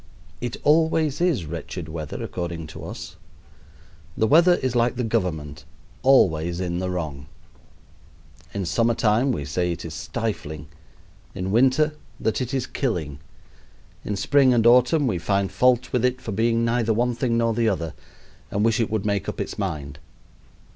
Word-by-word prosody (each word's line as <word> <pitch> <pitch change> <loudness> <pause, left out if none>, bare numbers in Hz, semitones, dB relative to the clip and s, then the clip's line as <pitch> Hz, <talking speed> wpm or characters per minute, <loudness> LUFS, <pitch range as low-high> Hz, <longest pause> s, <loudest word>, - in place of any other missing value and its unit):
It 120 -1 -3
always 160 0 +2
is 165 - +1
wretched 85 +1 -6
weather 80 -2 -6
according 85 -2 -4
to - - -9
us. - - -8 1.0
The 110 - +3
weather 170 +8 +6
is 130 -5 -2
like 120 +1 +2
the 125 - -2
government 80 -9 -2 0.4
always 85 -10 +3
in 90 -1 -2
the 95 0 -2
wrong. 75 -6 -4 1.2
In 100 -2 -3
summer 115 +9 +1
time 115 +5 +2
we 75 - -3
say 90 +5 -1
it 85 - -5
is - - -6
stifling; 80 -9 -4 0.7
in 95 +1 -3
winter 135 +7 +3 0.3
that 110 - -1
it 125 -1 -3
is 135 -2 -1
killing; 80 - -3 0.8
in 105 - -3
spring 130 +5 +4
and 115 -1 +2
autumn 125 +6 +5
we 100 -9 0
find 100 +2 0
fault 125 -1 +2
with 125 -2 +1
it 125 0 +1
for 110 - -6
being 115 +3 +1
neither 115 -1 +1
one 120 +2 +1
thing 120 -1 0
nor 115 -1 +2
the 115 0 +2
other 85 -6 -2 0.6
and 105 +2 0
wish 115 0 +2
it 115 - +1
would 110 -2 -2
make 100 -2 -1
up - - -6
its - - -4
mind. 70 -2 -4
110 Hz, 165 wpm, -24 LUFS, 85-125 Hz, 1.2 s, weather